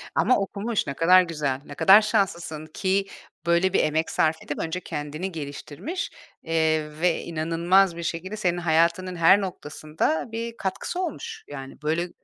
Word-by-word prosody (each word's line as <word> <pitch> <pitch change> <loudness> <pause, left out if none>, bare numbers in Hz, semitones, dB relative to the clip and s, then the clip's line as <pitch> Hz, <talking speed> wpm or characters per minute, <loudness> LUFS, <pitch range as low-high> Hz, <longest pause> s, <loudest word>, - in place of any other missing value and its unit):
Ama 255 - +4
okumuş. 205 +3 -2
Ne 140 - -2
kadar 180 +5 +6
güzel, 150 -6 -2
ne 145 - -10
kadar 195 +7 +7
şanslısın 175 -7 -1
ki, 190 +5 0 0.4
böyle 170 +2 +2
bir - - +4
emek 155 +1 +1
sarf 160 0 +1
edip, 145 - -5
önce 165 +3 -2
kendini 155 +4 -5
geliştirmiş, 155 - -6 0.3
eee, 160 -1 +1
ve 175 -2 +2
inanılmaz 170 +3 +2
bir 170 - -5
şekilde 175 +5 -4
senin 175 -4 0
hayatının 170 +2 +1
her 170 +4 +5
noktasında, 155 -3 -2
bir 230 +1 -5
katkısı 190 - -3
olmuş, 340 -6 -5
yani, 135 0 -9
böyle 165 +3 0
170 Hz, 150 wpm, -25 LUFS, 155-190 Hz, 0.4 s, kadar